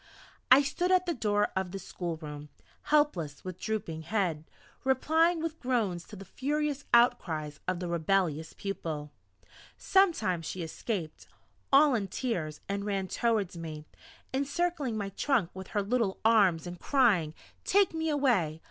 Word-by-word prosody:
I 265 +3 +8
stood 350 +6 -1
at 370 0 +4
the 345 - 0
door 210 -5 +1
of 190 -1 -1
the 195 - -5
schoolroom, 155 -5 -6 0.4
helpless, 290 - +1
with 185 -1 -6
drooping 205 -8 -3
head, 165 -4 -1 0.4
replying 320 +5 +2
with 325 -1 -4
groans 215 -9 -1
to 210 - -11
the 195 0 -10
furious 290 - -2
outcries 165 - +2
of 185 -1 0
the 180 - -3
rebellious 170 -2 0
pupil. 160 -7 -5 0.7
Sometimes 330 - +2
she 185 - -4
escaped, 165 0 -5 0.4
all 280 +1 +6
in 210 -5 0
tears, 175 - -3
and 200 0 -2
ran 195 -2 -2
towards 220 -6 0
me, 155 -2 -7 0.5
encircling 285 -2 -1
my 200 -2 -3
trunk 200 -3 0
with 190 0 -8
her 205 - -1
little 220 -2 0
arms, 200 -8 +4
and 175 0 -7
crying: 200 - +2 0.3
"Take 395 -3 +3
me 320 0 -1
away! 235 - +1
200 Hz, 145 wpm, -30 LUFS, 170-270 Hz, 0.7 s, I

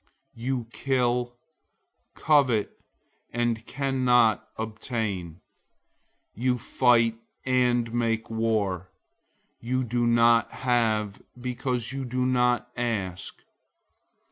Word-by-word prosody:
You 125 0 -3
kill, 125 -2 0 0.8
covet, 130 -9 +3 0.6
and 120 -2 -1
can't 125 -4 +2 0.2
obtain. 110 - -4 0.9
You 125 +2 0
fight 115 -1 +2 0.3
and 125 -2 +2
make 115 -2 0
war. 105 -5 -1 0.7
You 130 +2 -1
don't 120 0 +1 0.3
have, 110 -5 0 0.2
because 125 -1 -3
you 135 -1 -4
don't 125 +1 0 0.4
ask. 105 -7 -3
120 Hz, 75 wpm, -26 LUFS, 110-125 Hz, 0.9 s, covet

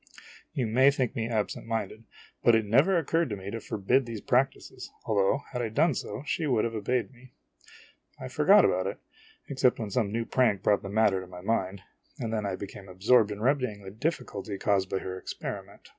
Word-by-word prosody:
You 130 - -1
may 130 +5 +5
think 135 -2 -1
me 115 -2 -2
absent 110 -1 -2
minded; 115 -1 -3 0.4
but 120 - +6
it 110 -1 +1
never 135 - +4
occurred 165 0 +1
to 105 - -2
me 95 0 -7
to 115 - -4
forbid 110 +5 0
these 115 -2 -5
practices, 130 +5 -1 0.2
although, 105 +6 +1
had 125 - -3
I 115 - -2
done 150 +8 +2
so, 110 +1 -5
she 160 -1 -1
would 120 -6 +2
have 115 - -3
obeyed 120 +1 -1
me. 125 0 -18 0.9
I 130 - -6
forgot 175 +10 +5
about 95 +1 +1
it, 100 - -4 0.5
except 130 -2 +2
when 110 -3 -5
some 110 -4 0
new 115 +1 -1
prank 115 -8 +1
brought 105 -1 +3
the 100 - -7
matter 105 -2 +2
to 95 - -10
my 90 0 -10
mind, 95 -2 -1 0.3
and 115 -1 -4
then 105 -2 -1
I 95 - -2
became 95 0 -9
absorbed 105 +4 +3
in 105 0 -6
remedying 125 -5 0
the 95 - -8
difficulty 110 - -3
caused 95 -1 +1
by 95 - -1
her 95 0 -5
experiment. - - -7
115 Hz, 205 wpm, -28 LUFS, 100-130 Hz, 0.9 s, but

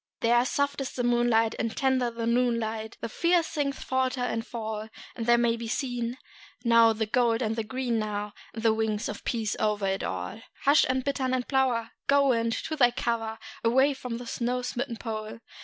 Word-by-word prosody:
There 240 +1 +4
soft 285 +1 0
is 270 - -3
the 245 - -2
moonlight, 240 -2 +3
and 225 -1 -2
tender 260 -2 +2
the 230 0 -4
noon 235 0 +2
light; 220 0 -4
There - - -2
fiery 340 +7 +2
things 290 -4 -2
falter 260 0 0
and 225 -2 -1
fall; 220 -2 -5 0.3
And 230 -1 -4
there 240 0 +6
may 235 -1 +2
be 230 0 -6
seen, 245 -1 -2 0.5
now, 230 -1 +6
the 220 0 -1
gold 235 +2 +2
and 220 0 -1
the 225 - -1
green, 245 0 -1
now, 210 -1 -3 0.2
And 225 - -5
the 225 -1 +5
wings 220 -1 -1
of 210 - -5
a - - -22
peace 225 -3 -1
over 205 -3 +1
all. 90 - -4 0.2
Hush, 285 +2 +5 0.2
bittern 265 -2 0
and 250 -1 -2
plover! 255 -4 +1 0.2
Go, 280 0 +4
wind, 230 -2 +2
to 315 - -3
thy 250 -5 +5
cover 230 -2 -2 0.3
Away 265 +5 +4
by 250 -3 -5
the 245 - -8
snow 245 +2 -2
smitten 245 -1 -3
Pole! 215 -2 -5
235 Hz, 195 wpm, -28 LUFS, 225-255 Hz, 0.5 s, there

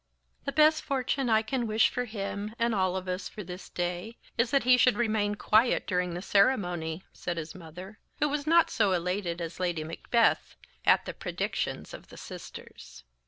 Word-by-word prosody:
"The 280 - -1
best 310 +1 +5
fortune 265 -1 -1
I 220 0 +4
can 240 +1 -2
wish 220 +1 +4
for 250 - -2
him, 210 -1 -5
and 235 0 +1
all 185 -2 +1
of 185 0 -6
us, 185 +1 -3
for 210 - -8
this 180 +1 -9
day 180 +6 -3 0.2
is, 235 +1 +2
that 275 +1 +2
he 250 +1 +6
should 250 0 +4
remain 215 -3 +1
quiet 220 +3 +3
during 180 -2 -1
the 175 - -5
ceremony," 180 -7 +1
said 175 -1 -4
his 160 -1 -5
mother, 180 +4 -10 0.2
who 295 - +2
was 295 0 -2
not 335 +1 +5
so 205 -5 +2
elated 180 0 -1
as 170 +1 -6
Lady 175 -3 -1
Macbeth 160 +1 +1 0.3
at - - +5
the - - -5
predictions - - -3
of - - -10
the - - -13
sisters. - - -10
205 Hz, 185 wpm, -29 LUFS, 180-240 Hz, 0.3 s, he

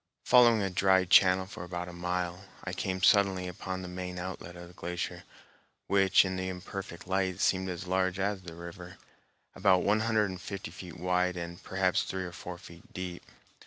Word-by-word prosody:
Following 120 -4 +6
a 95 - -1
dry 95 0 +4
channel 95 +1 +6
for 95 -2 -8
about 90 0 -5
a 90 - -8
mile, 90 +1 -3 0.2
I - - -4
came 95 -1 -3
suddenly 95 -3 +4
upon 95 +1 -5
the - - -6
main 90 0 -5
outlet 90 -1 -6
of 85 0 -9
the 90 - -15
glacier, 90 0 -5 0.6
which 95 -1 +5
in 95 0 -2
the 95 0 -2
imperfect 90 -1 -7
light 95 -1 0
seemed 95 -1 +2
as 90 +1 -5
large 95 0 +1
as 100 0 -1
the 85 -2 -9
river, 90 +1 -9 0.6
about 95 -2 +3
one 105 +2 +3
hundred 110 -3 +1
and 90 -1 -8
fifty 100 -4 -6
feet 85 -1 -9
wide, 90 +1 +1
and 85 0 -6
perhaps 95 -1 +1
three 95 0 -3
or 90 - -6
four 90 +1 -7
feet 85 -1 -14
deep. 90 -1 -5
90 Hz, 190 wpm, -30 LUFS, 90-95 Hz, 0.6 s, Following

